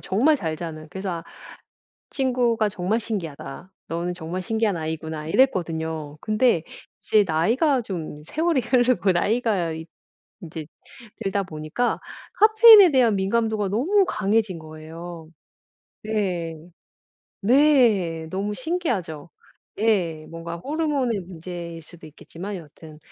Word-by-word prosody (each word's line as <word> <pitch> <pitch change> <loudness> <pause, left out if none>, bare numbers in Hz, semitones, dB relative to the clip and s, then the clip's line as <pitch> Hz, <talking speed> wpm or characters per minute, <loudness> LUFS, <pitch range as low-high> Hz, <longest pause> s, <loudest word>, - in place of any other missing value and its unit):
정말 265 +11 +2
잘 165 - -3
자는. 155 -2 -7
그래서 190 0 -4
아 165 -1 -5 0.9
친구가 245 -5 +1
"정말 195 +4 -1
신기하다. 175 -5 -6 0.2
너는 170 +2 -2
정말 175 +2 -5
신기한 220 -1 0
아이구나." 160 -1 -4
이랬거든요. 160 - 0
근데 215 -5 +2 0.4
이제 215 -1 +3
나이가 235 - +2
좀 165 -8 -6
세월이 315 - +1
흐르고 245 -5 +2
나이가 200 -2 +1
이 160 0 -7 0.6
인제 160 -3 -7 0.6
들다 195 0 0
보니까 155 +7 -2 0.3
카페인에 435 -3 +8
대한 245 -6 +4
민감도가 215 +1 0
너무 350 - +2
강해진 210 -2 0
거예요. 160 +2 -9 0.8
네. 185 -7 -2 0.8
네. 220 - +3
너무 200 +3 -2
신기하죠? 240 - -3 0.5
예. 180 -8 +1
뭔가 165 0 -6
호르몬의 280 - -1
문제일 170 -1 -8
수도 160 +1 -14
있겠지만 175 +6 -8
여하튼 155 -1 -12
190 Hz, 270 characters per minute, -24 LUFS, 165-235 Hz, 0.9 s, 카페인에